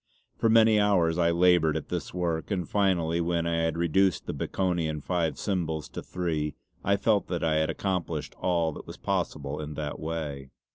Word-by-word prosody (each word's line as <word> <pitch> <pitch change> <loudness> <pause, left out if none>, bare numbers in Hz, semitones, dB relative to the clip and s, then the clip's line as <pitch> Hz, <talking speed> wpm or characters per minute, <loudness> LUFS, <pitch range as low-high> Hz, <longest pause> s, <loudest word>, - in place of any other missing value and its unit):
For 115 - +2
many 110 -1 +6
hours 90 -5 +3
I 85 -1 +4
laboured 85 -2 +4
at - - -7
this - - -3
work, 85 -3 -2
and 90 -5 -1
finally 85 -5 +1
when 85 0 0
I 85 0 0
had 80 0 0
reduced 85 +2 +2
the - - -3
Baconian 85 -5 -1
five 85 +1 -1
symbols 80 -6 -2
to - - -6
three 80 -4 -2 0.3
I 100 +1 +2
felt 105 0 +2
that 85 -2 -2
I 80 -1 +2
had 80 0 +1
accomplished 95 -3 -2
all 85 -3 +1
that - - -10
was - - -8
possible 75 +1 -2
in 75 0 -6
that 75 -1 -4
way. 75 -4 -4
85 Hz, 185 wpm, -28 LUFS, 80-90 Hz, 0.3 s, many